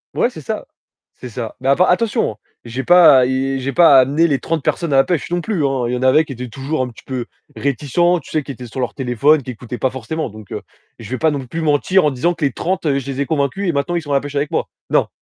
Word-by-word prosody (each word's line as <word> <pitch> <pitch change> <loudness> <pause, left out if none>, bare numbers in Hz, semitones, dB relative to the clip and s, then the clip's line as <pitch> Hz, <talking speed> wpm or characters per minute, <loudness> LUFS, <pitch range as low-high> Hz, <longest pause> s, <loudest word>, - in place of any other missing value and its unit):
Ouais, - - +2
c'est - - -10
ça - - -4 0.6
c'est 125 - -7
ça 115 -1 -5
mais 130 - -4
appar 160 +7 +4
attention, 210 - +1
hein, - - -22 0.3
j'ai 120 +3 -5
pas 165 -8 +7
et 135 +1 -1
j'ai 135 +1 -3
pas 165 -6 +7
amené 145 +6 +3
les 145 -5 +1
30 160 -3 -2
personnes 165 -5 -1
à - - +4
la 135 - +6
pêche 175 -3 -2
non 175 0 0
plus, 165 -8 0
hein, 135 -2 -1
il 125 - -2
y - - 0
en 125 - -5
avait 130 +5 +5
qui 150 - -10
étaient 125 0 -6
toujours 135 +4 -3
un 130 - -1
petit 115 - -15
peu 130 -3 -4 0.3
réticents, 150 +6 +1
tu - - -15
sais, 155 - +1
qui 140 0 -7
étaient 125 0 -10
sur 125 +4 -7
leur 125 - -2
téléphone, 135 +3 +2
qui 125 - -6
écoutaient 120 +1 -7
pas 130 - +1
forcément, 155 +2 -4
donc 105 -1 -13
heu, - - -4 0.4
je 115 -1 -10
vais 130 - -1
pas 160 - +2
non 140 -3 -4
plus 165 +7 -5
mentir 160 +4 +2
en 150 - +2
disant 135 +7 0
que 160 -3 -1
les 135 - 0
30 185 +2 -2
je 135 - -4
les 135 - -6
ai - - 0
convaincus 150 +6 -1
et 170 - +1
maintenant, 140 +5 -1
ils 170 - 0
sont 145 - -7
à 140 - +2
la 140 - +2
pêche 145 0 -8
avec 145 +1 0
moi, - - -1 0.2
non! - - +2
140 Hz, 290 wpm, -18 LUFS, 130-160 Hz, 0.6 s, pas